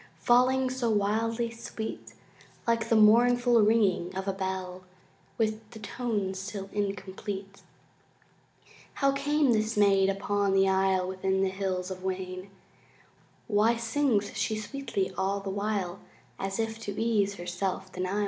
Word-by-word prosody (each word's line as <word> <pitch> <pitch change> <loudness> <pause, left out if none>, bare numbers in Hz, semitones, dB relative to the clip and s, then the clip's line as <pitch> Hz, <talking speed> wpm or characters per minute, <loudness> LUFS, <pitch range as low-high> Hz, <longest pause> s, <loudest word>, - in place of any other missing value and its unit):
Falling 255 +2 +3
so 255 -2 -1
wildly 225 +3 0
sweet, 225 -1 -7 0.5
Like 230 -1 +1
the 230 - +4
mournful 240 +2 +5
ringing 200 -4 +2
of 190 +1 -4
a 195 - +1
bell 190 -1 -4 0.5
With 215 -1 -1
the 225 - -11
tones 205 -3 -3
still 195 0 -6
incomplete. 195 0 -4 1.3
How 275 -1 +3
came 280 -1 +2
this 215 0 0
maid 195 -2 +4
upon 200 0 0
the 195 0 +4
isle 190 -1 +2
Within 190 +1 0
the 190 - +2
Hills 190 -1 -2
of 185 0 -7
Wayne? 185 0 -4 1.0
Why 220 +2 +3
sings 230 -3 0
she 210 +2 -1
sweetly 215 -5 -3
all 195 +1 0
the 195 -1 -5
while 200 -2 -2 0.4
As 195 0 -3
if 225 0 -2
to 205 -3 -5
ease 210 -3 +1
her 175 - -8
self 185 +1 -3
denial? 185 +2 -2
205 Hz, 140 wpm, -28 LUFS, 190-225 Hz, 1.3 s, mournful